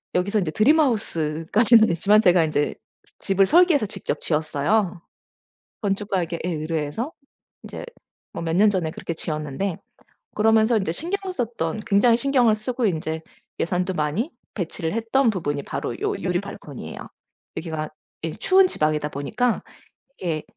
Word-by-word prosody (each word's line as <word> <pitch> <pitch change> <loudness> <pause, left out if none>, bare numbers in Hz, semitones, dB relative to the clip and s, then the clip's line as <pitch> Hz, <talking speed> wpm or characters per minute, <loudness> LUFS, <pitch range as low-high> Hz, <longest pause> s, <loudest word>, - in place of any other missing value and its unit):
여기서 200 +4 +1
이제 165 -5 -1
드림하우스 215 - +2
까지는 225 +1 +6
아니지만 205 +5 +4
제가 180 -4 +5
이제 145 -1 0 0.5
집을 195 0 +3
설계해서 335 - +5
직접 205 - -4
지었어요. 165 +5 0 0.8
건축가에게 195 -4 -1
예 - - 0
의뢰해서 160 - -3 0.5
이제 - - -7 0.5
뭐 - - -5
몇 165 0 -1
년 210 +2 +6
전에 175 -5 -1
그렇게 165 - -5
지었는데 155 +3 -3 0.6
그러면서 220 +1 +4
인제 190 -5 -1
신경을 375 - -3
썼던 220 - -2
굉장히 225 +3 +4
신경을 250 -5 +3
쓰고 240 +2 -2
인제 160 -3 -1 0.4
예산도 180 +2 0
많이 165 - -1 0.2
배치를 165 -3 -3
했던 230 +3 +2
부분이 145 -8 -2
바로 - - -4
요 415 0 0
유리 180 -1 -1
발코니예요. 150 -8 -9 0.6
여기가 160 -2 -4 0.3
예 165 - -2
추운 380 - +4
지방이다 155 - 0
보니까 215 - -1 0.6
이게 160 -4 -2
195 Hz, 340 characters per minute, -23 LUFS, 160-225 Hz, 0.8 s, 까지는